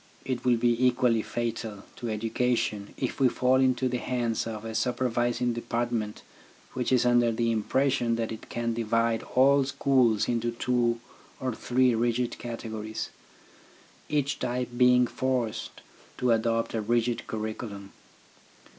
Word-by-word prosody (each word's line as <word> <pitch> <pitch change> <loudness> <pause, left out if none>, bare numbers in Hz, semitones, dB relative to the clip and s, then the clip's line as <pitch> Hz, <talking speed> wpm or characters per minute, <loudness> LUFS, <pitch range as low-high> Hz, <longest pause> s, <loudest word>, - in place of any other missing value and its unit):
It 125 -2 -2
will 125 -2 +3
be 120 +1 +2
equally 125 -2 +2
fatal 115 -3 -4
to 120 - -4
education 110 -1 -1
if 130 - -3
we 130 -2 +5
fall 130 +2 +2
into 130 0 +2
the 125 0 -1
hands 120 -3 -1
of 110 -1 -6
a 110 - -5
supervising 120 0 0
depart 120 +1 -2
ment 105 -3 -3 0.5
which 125 0 -2
is 125 -2 +4
under 120 -1 +4
the 115 +1 0
impression 120 +2 +1
that 115 -1 -2
it 110 - -8
can 120 -1 -2
divide 115 0 +1
all 140 +2 +5
schools 130 -5 +2
into 120 0 0
two 120 -1 +1 0.4
or 130 -2 -2
three 125 +2 +2
rigid 120 +1 0
cate 120 -1 -6
gories, 110 -1 -5 1.0
each 145 -1 0
type 125 0 -2
being 125 0 +5
forced 120 -2 -2 0.4
to 125 -1 +2
adopt 115 0 +1
a 110 - -1
rigid 120 +2 0
curriculum. 110 -2 -5
120 Hz, 145 wpm, -28 LUFS, 115-125 Hz, 1.0 s, we